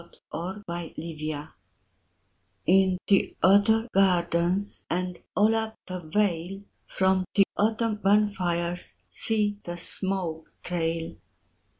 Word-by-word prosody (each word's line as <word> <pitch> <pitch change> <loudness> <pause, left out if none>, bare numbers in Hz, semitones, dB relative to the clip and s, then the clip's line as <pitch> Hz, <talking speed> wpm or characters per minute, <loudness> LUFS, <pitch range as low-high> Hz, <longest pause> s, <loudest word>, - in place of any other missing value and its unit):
VI 170 - -18 0.2
Autumn 190 +5 -5
Fires 155 -3 -5 1.2
In 190 0 +4
the 195 - +2
other 210 +4 +5
gardens 180 0 +2
And 180 0 -2 0.2
all 215 +2 +4
up 220 0 -2
the 185 0 -5
vale, 180 +2 -1 0.2
From 190 0 +2
the 200 - +7
autumn 220 +1 +1
bonfires 185 -4 0 0.2
See 210 -2 +1
the 175 0 -6
smoke 175 -3 -1
trail! 165 -1 -2
185 Hz, 100 wpm, -27 LUFS, 170-205 Hz, 1.2 s, the